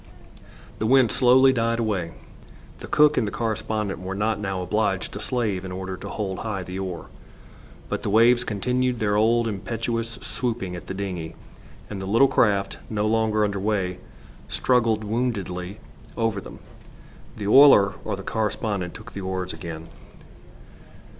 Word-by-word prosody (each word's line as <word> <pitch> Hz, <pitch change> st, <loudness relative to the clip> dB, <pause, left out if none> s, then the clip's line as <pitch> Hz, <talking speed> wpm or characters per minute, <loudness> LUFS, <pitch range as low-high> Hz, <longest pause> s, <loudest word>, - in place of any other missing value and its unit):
The 110 Hz, -, 0 dB
wind 130 Hz, -2 st, +5 dB
slowly 130 Hz, +1 st, +5 dB
died 115 Hz, -1 st, +1 dB
away. 100 Hz, -8 st, -1 dB, 0.7 s
The -, -, -8 dB
cook 150 Hz, 0 st, +4 dB
and 110 Hz, -, 0 dB
the -, -, -3 dB
correspondent 110 Hz, -2 st, -2 dB
were 95 Hz, +1 st, -5 dB
not 105 Hz, +1 st, 0 dB
now 95 Hz, -3 st, -3 dB
obliged 100 Hz, -1 st, -1 dB
to -, -, -5 dB
slave 110 Hz, -7 st, -1 dB
in 95 Hz, -, -6 dB
order 95 Hz, 0 st, -5 dB
to -, -, -8 dB
hold 95 Hz, -3 st, -3 dB
high 105 Hz, -4 st, -3 dB
the 90 Hz, +2 st, -6 dB
oar. 90 Hz, -3 st, -6 dB, 0.8 s
But -, -, -3 dB
the -, -, -2 dB
waves 120 Hz, +3 st, +5 dB
continued 125 Hz, +3 st, 0 dB
their 105 Hz, -1 st, +1 dB
old 115 Hz, +2 st, +3 dB
impetuous 115 Hz, +2 st, -3 dB
swooping 115 Hz, -8 st, -3 dB
at 85 Hz, -, -9 dB
the 95 Hz, -, -5 dB
dingey, 90 Hz, -5 st, -5 dB, 0.5 s
and 100 Hz, -2 st, -6 dB
the 95 Hz, -, -5 dB
little 115 Hz, +7 st, +5 dB
craft, 100 Hz, -6 st, +1 dB
no 105 Hz, -1 st, -1 dB
longer 110 Hz, -1 st, +2 dB
under 100 Hz, -1 st, -2 dB
way, 95 Hz, -3 st, -1 dB, 0.5 s
struggled 115 Hz, -4 st, +2 dB
woundily 100 Hz, -4 st, -3 dB, 0.4 s
over 115 Hz, -4 st, 0 dB
them. -, -, -11 dB, 0.8 s
The 105 Hz, -, -5 dB
oiler 105 Hz, -5 st, +7 dB
or -, -, -2 dB
the 95 Hz, -, -9 dB
correspondent 105 Hz, -4 st, -2 dB
took -, -, -11 dB
the 100 Hz, -, -5 dB
oars 95 Hz, -1 st, -3 dB
again. 80 Hz, -1 st, -7 dB
105 Hz, 155 wpm, -24 LUFS, 95-115 Hz, 0.8 s, oiler